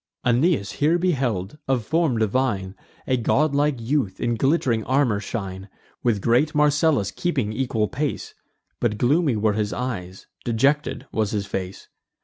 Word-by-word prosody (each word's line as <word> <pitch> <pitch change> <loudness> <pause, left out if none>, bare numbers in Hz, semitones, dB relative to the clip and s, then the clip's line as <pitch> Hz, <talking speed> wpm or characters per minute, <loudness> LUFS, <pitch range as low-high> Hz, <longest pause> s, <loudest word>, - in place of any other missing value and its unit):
Aeneas 125 - +2
here 155 +4 +2
beheld, 135 - -1
of 130 -4 0
form 160 -5 +1
divine, 110 -4 0 0.3
A 130 - +1
godlike 145 +2 +1
youth 115 -4 -1
in 120 -1 0
glitt'ring 130 -3 +1
armour 130 -6 +2
shine, 95 -3 -5 0.3
With 110 -5 0
great 135 +7 +2
Marcellus 150 - +3
keeping 130 - -1
equal 115 -3 0
pace; 145 +5 -3 0.5
But 105 - 0
gloomy 140 +3 +2
were 105 0 +1
his 105 0 -1
eyes, 95 -8 -5 0.2
dejected 135 +6 +1
was 110 -2 0
his 100 -2 -2
face. 95 -1 -5
120 Hz, 135 wpm, -23 LUFS, 105-145 Hz, 0.5 s, Marcellus